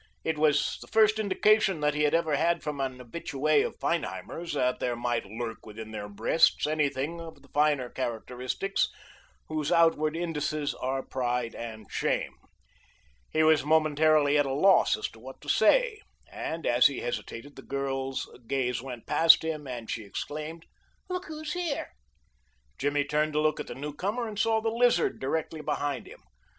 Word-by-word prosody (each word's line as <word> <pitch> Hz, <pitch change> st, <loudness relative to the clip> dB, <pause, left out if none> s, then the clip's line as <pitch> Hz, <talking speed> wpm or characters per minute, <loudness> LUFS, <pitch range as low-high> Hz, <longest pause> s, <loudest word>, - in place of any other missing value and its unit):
It 160 Hz, -2 st, -1 dB
was 150 Hz, -2 st, +2 dB
the -, -, -10 dB
first 220 Hz, 0 st, +4 dB
indication 205 Hz, -2 st, +3 dB
that 150 Hz, 0 st, +2 dB
he 150 Hz, -, -1 dB
had 150 Hz, +1 st, +3 dB
ever 160 Hz, -3 st, +2 dB
had 170 Hz, +3 st, +1 dB
from 150 Hz, -2 st, -4 dB
an 130 Hz, -1 st, -2 dB
habitue 135 Hz, +3 st, -6 dB, 0.2 s
of -, -, -12 dB
Feinheimer's 165 Hz, -, -3 dB
that 125 Hz, -3 st, +1 dB
there 120 Hz, -1 st, -1 dB
might 120 Hz, -2 st, -2 dB
lurk 115 Hz, +2 st, -6 dB
within 110 Hz, +1 st, -9 dB
their 105 Hz, -1 st, -6 dB
breasts 110 Hz, +10 st, +3 dB
any 150 Hz, -1 st, +2 dB
of -, -, -6 dB, 0.5 s
the 140 Hz, -, -20 dB
finer 145 Hz, -3 st, +2 dB
characteristics 125 Hz, -, -2 dB, 0.6 s
whose 155 Hz, 0 st, -2 dB
outward 165 Hz, -2 st, +3 dB
indices 155 Hz, -3 st, -2 dB
are 130 Hz, +1 st, -2 dB
pride 125 Hz, -2 st, -2 dB
and 110 Hz, -2 st, -7 dB
shame. -, -, -1 dB, 1.0 s
He 155 Hz, -, +2 dB
was 155 Hz, -2 st, +5 dB
momentarily 155 Hz, -1 st, +4 dB
at 145 Hz, -, +2 dB
a 135 Hz, -, -1 dB
loss 190 Hz, +6 st, +5 dB
as 110 Hz, -, -2 dB
to 110 Hz, -, -17 dB
what 130 Hz, +3 st, -11 dB
to -, -, -8 dB
say, 445 Hz, -, +3 dB, 0.3 s
and 165 Hz, 0 st, -4 dB
as 120 Hz, 0 st, +6 dB
he 140 Hz, -, -4 dB
hesitated 120 Hz, +3 st, -5 dB
the -, -, -10 dB
girl's 135 Hz, -1 st, -3 dB, 0.2 s
gaze 125 Hz, -3 st, 0 dB
went 125 Hz, -3 st, -8 dB
past 165 Hz, 0 st, +6 dB
him 155 Hz, -3 st, -3 dB
and 120 Hz, -3 st, -6 dB
she 110 Hz, -, -3 dB
exclaimed: 155 Hz, +10 st, -6 dB, 0.4 s
"Look 365 Hz, 0 st, -3 dB
who's 310 Hz, 0 st, -5 dB
here!" 350 Hz, -5 st, -2 dB, 0.9 s
Jimmy 145 Hz, +1 st, +1 dB
turned 150 Hz, +1 st, 0 dB
to 150 Hz, -, +1 dB
look 155 Hz, 0 st, +1 dB
at -, -, -5 dB
the -, -, -7 dB
newcomer, 190 Hz, -, -3 dB
and 210 Hz, -1 st, -6 dB
saw 220 Hz, 0 st, +2 dB
the 225 Hz, 0 st, 0 dB
Lizard 240 Hz, +1 st, +2 dB
directly 155 Hz, +3 st, -2 dB
behind 145 Hz, -2 st, -2 dB
him. -, -, -14 dB
150 Hz, 170 wpm, -28 LUFS, 130-165 Hz, 1.0 s, as